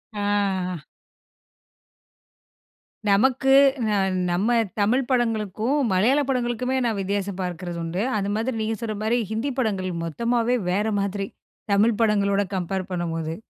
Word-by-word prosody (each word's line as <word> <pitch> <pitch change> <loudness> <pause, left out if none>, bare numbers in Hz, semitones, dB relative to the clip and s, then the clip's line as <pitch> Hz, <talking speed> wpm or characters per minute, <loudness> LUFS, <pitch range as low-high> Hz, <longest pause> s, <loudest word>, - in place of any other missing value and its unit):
ஆ. 200 -3 0 2.3
நமக்கு 260 +6 +3 0.4
ந - - 0 0.4
நம்ம 190 +7 +1 0.3
தமிழ் 230 +6 +2
படங்களுக்கும், 225 -1 0 0.2
மலையாள 230 +10 +3
படங்களுமே 250 0 0
நான் 225 -3 0
வித்தியாசம் 195 0 -2
பார்க்கிறது 175 -1 -4
உண்டு. 170 +3 -2 0.2
அது 200 0 -1
மாதிரி 230 +2 -1
நீங்க 220 0 -1
சொல்ற 220 -2 -3
மாரி 235 +3 +2
ஹிந்தி 230 +6 -1
படங்கள் 195 -6 -1
மொத்தமாவே 235 +7 0 0.2
வேற 200 +3 +1 0.2
மாதிரி. 200 0 -2 0.5
தமிழ் 210 +2 +3
படங்களோட 200 -2 +2
கம்பேர் 185 +1 -3
பண்ணும்போது. 165 -2 -3
205 Hz, 115 wpm, -24 LUFS, 185-235 Hz, 2.3 s, நமக்கு